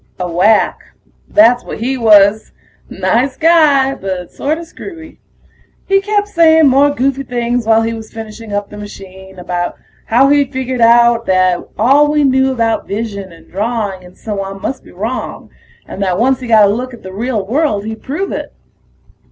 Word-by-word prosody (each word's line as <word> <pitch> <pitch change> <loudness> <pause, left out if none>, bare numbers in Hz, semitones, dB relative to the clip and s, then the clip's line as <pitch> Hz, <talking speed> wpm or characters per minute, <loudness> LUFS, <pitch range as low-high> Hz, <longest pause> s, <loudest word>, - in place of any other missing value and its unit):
A 180 - -2
wack, 185 +6 +2 0.5
that's 245 -5 +4
what - - -7
he 255 +4 -1
was. 215 -3 +4 0.4
Nice 255 +3 0
guy, 305 -5 +4
but 185 -6 -6
sorta 315 +4 -3
screwy. 330 -1 -11 0.7
He 390 0 +2
kept 410 0 0
saying 320 -5 +4
more 275 +2 +4
goofy 275 -1 -1
things 240 -2 -2
while 225 0 +4
he 225 0 -2
was 220 -1 -9
finishing 225 0 -9
up 205 0 -3
the 210 - -9
machine, 190 -2 -11
about 175 0 -3 0.3
how 260 +5 +4
he'd 285 -2 +2
figured 260 -2 -3
out 235 0 +4
that 185 -1 +2 0.2
all 280 +6 +4
we 300 -1 +2
knew 265 -1 +2
about 230 -3 -1
vision 200 -3 -5
and 165 -1 -18
drawing 205 -2 -3
and 180 0 -16
so 205 -3 -5
on 195 0 -7
must 260 - -5
be - - -16
wrong, 220 +8 -5 0.4
and 195 - -8
that 185 -2 0
once 260 +4 +1
he 255 - -7
got 220 -2 +5
a 200 - +2
look 250 +2 -5
at - - -19
the 190 0 -9
real 220 -1 -2
world 230 -3 -1
he'd 220 0 -6
prove 310 +9 -4
it. - - -5
230 Hz, 175 wpm, -14 LUFS, 200-270 Hz, 0.7 s, got